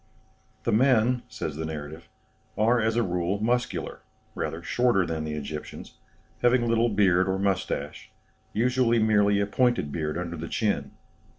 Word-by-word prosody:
"The - - 0
men," 125 +1 +3
says 75 -2 -5
the 80 - -3
narrative, 80 +2 -7 0.5
"are, 115 +3 +3
as 110 +1 +1
a 120 - +2
rule, 90 +1 -1
muscular, 120 +3 -1 0.3
rather 85 +1 -4
shorter 120 -3 +2
than 80 -2 -3
the 75 -1 -4
Egyptians, 75 +1 -7 0.4
having 120 -1 +3
little 115 +1 +2
beard 95 -3 +3
or 95 - 0
moustache, 100 -1 -2 0.4
usually 125 +1 +2
merely 105 -2 +3
a 100 - +2
pointed 120 - +1
beard 75 0 -2
under 85 -1 -4
the 80 +1 -6
chin. 70 -11 -1
100 Hz, 150 wpm, -26 LUFS, 85-120 Hz, 0.5 s, men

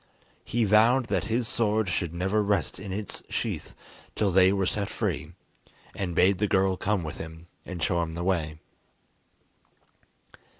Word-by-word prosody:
He 120 0 0
vowed 115 +4 +4
that - - 0
his 115 +1 0
sword 110 -3 +1
should 85 -1 -1
never 95 +5 0
rest 100 -7 0
in 95 0 -7
its 100 +1 -4
sheath - - -3 0.4
till 105 -2 +1
they 95 +1 +6
were 95 -1 +1
set 100 +2 0
free, 85 -7 -3 0.6
and 90 -4 -3
bade 95 0 +4
the 105 - +2
girl 95 -1 +2
come 100 0 0
with 80 0 -6
him, 80 +1 -8 0.2
and 90 -4 -5
show 85 -1 +1
him 80 -1 -4
the 85 - -3
way. 80 -4 0
95 Hz, 160 wpm, -27 LUFS, 85-105 Hz, 0.6 s, they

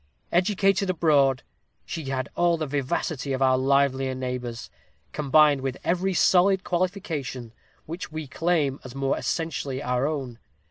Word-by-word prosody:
"Educated 195 +1 +2
abroad, 145 -7 +3 0.4
she 160 - -5
had 135 -1 -2
all 175 -1 +2
the 155 - -2
vivacity 140 0 -2
of 130 - -3
our 130 -1 +4
livelier 135 0 +1
neighbors, 125 -2 -5 0.4
combined 150 -1 +4
with 135 -1 -3
every 185 +2 0
solid 190 +2 +4
qualification 170 - -3 0.3
which 165 +1 -6
we 155 0 -5
claim 150 -2 0
as 130 0 -10
more 135 0 0
essentially 145 -5 -3
our 125 0 0
own. 135 -6 -4
140 Hz, 135 wpm, -25 LUFS, 130-170 Hz, 0.4 s, our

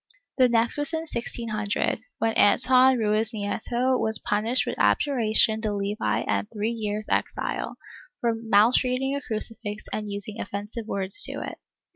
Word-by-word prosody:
The 255 -1 +5
next 235 +3 +2
was 290 +2 -2
in 320 - -1
1600, 230 -7 -3 0.2
when 225 0 0
Anton 255 +5 +5
Ruiznieto 220 +3 -1
was 220 -1 +1
punished 220 +4 0
with - - -5
abjuration 220 - +2
de 220 -1 -2
levi 200 - -2
and 100 0 -2
three 215 +2 -2
years' 215 -2 -4
exile, - - -2 0.4
for 235 -1 0
mal 225 0 +3
treating 260 +2 +1
a 280 - -3
crucifix 215 -2 -5
and 210 -1 -4
using 205 +2 -4
offensive 210 +3 -6
words 195 - +5
to - - -5
it. - - -8
220 Hz, 145 wpm, -25 LUFS, 205-245 Hz, 0.4 s, The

